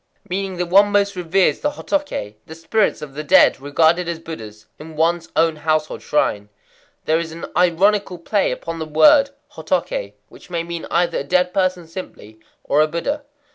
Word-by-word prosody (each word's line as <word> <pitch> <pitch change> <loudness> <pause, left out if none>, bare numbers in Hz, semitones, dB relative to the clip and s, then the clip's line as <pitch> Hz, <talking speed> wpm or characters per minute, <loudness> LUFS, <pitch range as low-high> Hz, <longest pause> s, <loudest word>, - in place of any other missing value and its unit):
Meaning 190 0 -3
that 180 - -1
one 200 +4 +4
most 200 -1 +2
reveres 180 +1 +1
the 295 - -1
hotoké—the 160 - -4
spirits 165 +3 0
of 140 -2 -9
the 150 +2 -5
dead 145 - +5
regarded 160 +5 +2
as 170 - -3
Buddhas—in 150 0 -11
one's 165 +2 0
own 165 -1 +2
household 155 0 -1
shrine. 105 -8 0 0.6
There 160 +1 +2
is 165 -1 -5
an 165 +1 -7
ironical 185 +2 +2
play 195 +4 0
upon 165 0 -5
the 160 - -4
word 215 - +5 0.2
hotoké, - - -2
which - - -17
may 170 -1 -2
mean 170 0 -6
either 170 0 +1
a - - -3
dead 180 +4 +1
person 185 -2 0
simply, 160 - -10 0.2
or 145 +2 +2
a 155 - +3
Buddha. 280 - -3
170 Hz, 170 wpm, -20 LUFS, 155-190 Hz, 0.6 s, dead